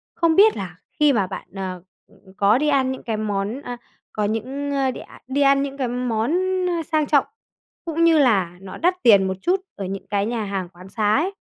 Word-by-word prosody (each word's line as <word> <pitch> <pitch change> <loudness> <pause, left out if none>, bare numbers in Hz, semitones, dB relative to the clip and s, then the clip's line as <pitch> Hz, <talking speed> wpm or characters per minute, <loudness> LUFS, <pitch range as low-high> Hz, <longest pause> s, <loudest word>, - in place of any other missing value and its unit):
không 330 -1 +2
biết 425 +4 +6
là 180 -3 -6 0.2
khi 300 -2 +5
mà 200 -6 +1
bạn, - - -7
ờ, 185 -2 -5 0.3
ừm, 190 - -21
có 205 +3 +4
đi 300 +3 0
ăn 265 -2 +2
những 260 - -7
cái 225 -2 -2
món 210 +4 -2
a, 245 -4 -6 0.4
có 215 - -1
những, 260 +7 -3
a, 270 -2 +1
đi - - -8
a - - -15
đi 270 +2 -1
ăn 275 0 +4
những 275 0 -5
cái 260 -3 -1
món 240 0 -1 0.6
sang 310 -2 +2
trọng, 285 -2 +3 0.6
cũng 330 0 0
như 330 -2 +5
là 195 -10 +2
nó 195 -1 -9
đắt 365 +2 0
tiền 200 -5 +6
một 190 - -2
chút 370 - +1
ở 195 - -5
những 195 +1 -6
cái 200 -1 0
nhà 230 0 -2
hàng 195 -3 -4
quán 180 +1 -14
xá 210 0 +1
ấy, 355 +8 0
240 Hz, 225 wpm, -22 LUFS, 200-285 Hz, 0.6 s, biết